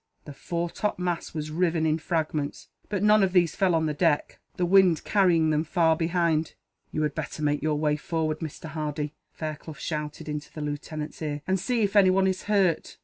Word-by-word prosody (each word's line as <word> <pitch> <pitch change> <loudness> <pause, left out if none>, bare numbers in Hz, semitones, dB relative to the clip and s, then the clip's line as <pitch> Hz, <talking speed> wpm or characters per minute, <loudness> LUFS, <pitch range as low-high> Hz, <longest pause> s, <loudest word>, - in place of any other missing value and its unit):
The 145 - -8
fore 170 +4 -3
top 210 - -2
mast 175 -2 -3
was 155 -1 -4
riven 165 -1 +1
in 155 0 +1
fragments, 155 -3 -2 0.2
but 205 -2 -1
none 210 0 +6
of 190 -2 +2
these 175 -3 +3
fell 185 -3 +2
on 160 -1 +1
the 155 - 0
deck, 150 -1 +1 0.2
the 180 - +1
wind 185 -2 +5
carrying 170 -6 +3
them 155 0 +1
far 165 0 +2
ahead. 165 -2 +1 0.4
"You 155 - -1
had 150 - 0
better 155 0 -5
make 145 -1 +1
your 155 0 0
way 150 0 +1
forward, 155 0 -2
Mr. 160 -1 -7
Hardy," 150 -1 -3 0.2
Fairclough 155 0 -6
shouted, 150 -1 -5
into 150 -1 -5
the 155 - -7
lieutenant's 150 +1 -5
ear, 145 -2 -3
"and 190 0 +1
see 230 +4 0
if 200 0 -1
anyone 190 -1 +5
is 190 -1 -1
hurt." 195 -6 +1
160 Hz, 200 wpm, -26 LUFS, 150-180 Hz, 0.4 s, none